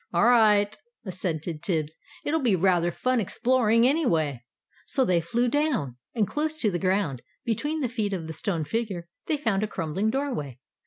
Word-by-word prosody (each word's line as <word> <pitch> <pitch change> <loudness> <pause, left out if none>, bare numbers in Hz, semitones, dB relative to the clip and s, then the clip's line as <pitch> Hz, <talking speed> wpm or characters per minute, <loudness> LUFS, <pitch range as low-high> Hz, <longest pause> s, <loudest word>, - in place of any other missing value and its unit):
"All 175 +5 +3
right," 215 -3 +5 0.3
assented 170 -4 -3
Tibbs; 160 -4 -1 0.3
"it'll 320 +2 +1
be 235 -7 +3
rather 175 -1 +3
fun 255 +8 0
exploring, 230 +2 +3
anyway." 160 - +1 0.4
So 265 - +2
they 175 -5 +2
flew 235 +10 0
down. 245 - 0 0.2
And 215 -4 +2
close 310 +1 -2
to 215 - +2
the 175 - -1
ground, 185 -9 0 0.2
between 295 +8 -1
the 260 - +1
feet 220 -4 -2
of 180 -4 -3
the 160 - -6
stone 165 0 -1
figure, 195 -2 -3 0.2
they 305 - +1
found 225 -8 0
a 215 - 0
crumbling 190 +3 -1
doorway. 230 - -2
205 Hz, 170 wpm, -26 LUFS, 170-245 Hz, 0.4 s, right